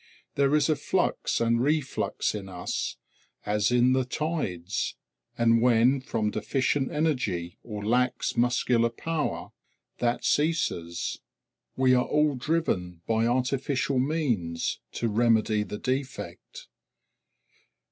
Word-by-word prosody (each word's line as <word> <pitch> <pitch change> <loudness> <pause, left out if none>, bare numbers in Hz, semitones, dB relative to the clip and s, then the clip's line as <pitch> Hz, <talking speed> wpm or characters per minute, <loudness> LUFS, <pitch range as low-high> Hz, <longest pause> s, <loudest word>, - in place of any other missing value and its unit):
There 140 +1 +3
is 150 -2 +3
a 155 - +3
flux - - 0
and 115 0 +2
reflux 145 +1 0
in 100 -2 -6
us, 90 -1 -3 0.5
as 105 -1 +1
in 125 +1 +4
the 130 0 +2
tides, 125 - -2 0.4
and 115 0 +4
when, 125 +2 +4
from 110 -4 -1
deficient 135 +5 0
energy 125 - -1
or 105 -3 -6
lax 125 +3 +1
muscular 120 -1 +2
power, 155 +6 -3 0.5
that 120 0 0
ceases, 145 - 0 0.6
we 130 -1 +4
are 125 0 +3
all 150 -1 +2
driven 125 - -1
by 115 0 +1
artificial 130 +2 0
means 125 - -1
to 120 - -1
remedy 110 -1 +2
the 105 0 -4
defect. 130 +3 -5
125 Hz, 115 wpm, -27 LUFS, 105-140 Hz, 0.6 s, in